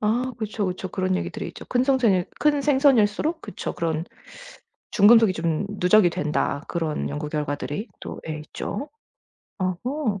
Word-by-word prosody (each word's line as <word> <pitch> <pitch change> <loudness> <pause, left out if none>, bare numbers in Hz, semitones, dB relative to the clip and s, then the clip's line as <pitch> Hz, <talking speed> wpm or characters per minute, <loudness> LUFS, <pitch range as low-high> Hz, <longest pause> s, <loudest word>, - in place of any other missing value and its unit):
아 240 +4 0
그쵸, 215 -2 -2
그쵸. 185 +1 -4
그런 185 0 0
얘기들이 - - -4
있죠. - - -10
큰 245 0 +1
성샌일 235 -10 +3
큰 295 -1 +3
생선일수록 275 +1 +3
그쵸 - - -5
그런 165 -2 -1 0.9
중금속이 220 0 +6
좀 165 +1 -1
누적이 180 0 +5
된다 150 -1 -1
그런 165 -3 -2
연구 150 +1 -4
결과들이 150 - -3
또 - - -7
예 155 -1 -3
있죠. 270 - -6 0.7
오호. 205 - -1
200 Hz, 300 characters per minute, -24 LUFS, 165-245 Hz, 0.9 s, 중금속이